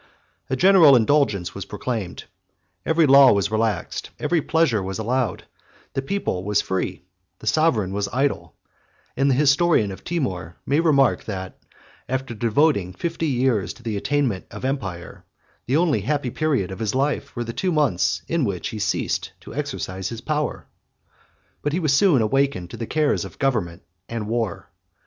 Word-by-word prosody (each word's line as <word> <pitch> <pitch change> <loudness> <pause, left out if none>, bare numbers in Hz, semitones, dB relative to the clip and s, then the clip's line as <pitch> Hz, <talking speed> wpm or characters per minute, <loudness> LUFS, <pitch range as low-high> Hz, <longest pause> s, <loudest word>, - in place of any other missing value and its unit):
A 130 - 0
general 175 -3 +7
indulgence 115 -7 +2
was 100 -1 -6
proclaimed: 105 -2 -4 0.6
every 160 0 +4
law 135 -1 +8
was 100 0 0
relaxed, 110 -3 -1
every 170 -2 +1
pleasure 160 -9 +2
was 95 0 -4
allowed; 120 +2 -1 0.5
the 135 - -1
people 135 - -2
was 105 +1 +1
free, 95 -1 -2 0.3
the - - -13
sovereign 115 - +2
was 100 0 -2
idle; 125 - -1 0.6
and 135 +2 +2
the 130 - +3
historian 140 - +3
of 95 - -10
Timour 95 - -3
may 140 +3 +2
remark, 140 -6 +3
that, 95 -3 -6 0.5
after 130 -1 -2
devoting 115 - +1
fifty 165 - -3
years 120 - +1
to 120 - -18
the 110 -3 -3
attainment 130 -2 -1
of 105 +5 -7
empire, 95 -11 -4 0.4
the 135 +4 +2
only 165 -3 +2
happy 145 -4 -1
period 135 - 0
of 95 - -7
his 110 0 -1
life 140 +2 -1
were 120 - -2
the 115 0 -6
two 185 +9 -1
months 145 - +1
in 165 -3 0
which 95 -7 -2
he 110 - -6
ceased 100 -1 -1
to - - -11
exercise 95 0 -4
his 115 - -6
power. 150 -1 -2 1.0
But 145 - -2
he 175 - +1
was 155 -5 +1
soon 145 - +4
awakened 110 -7 0
to - - -7
the 115 - -5
cares 155 -2 +1
of - - -10
government 105 -11 -1 0.3
and 115 -2 -4
war. 115 -4 -2
125 Hz, 165 wpm, -23 LUFS, 100-145 Hz, 1.0 s, law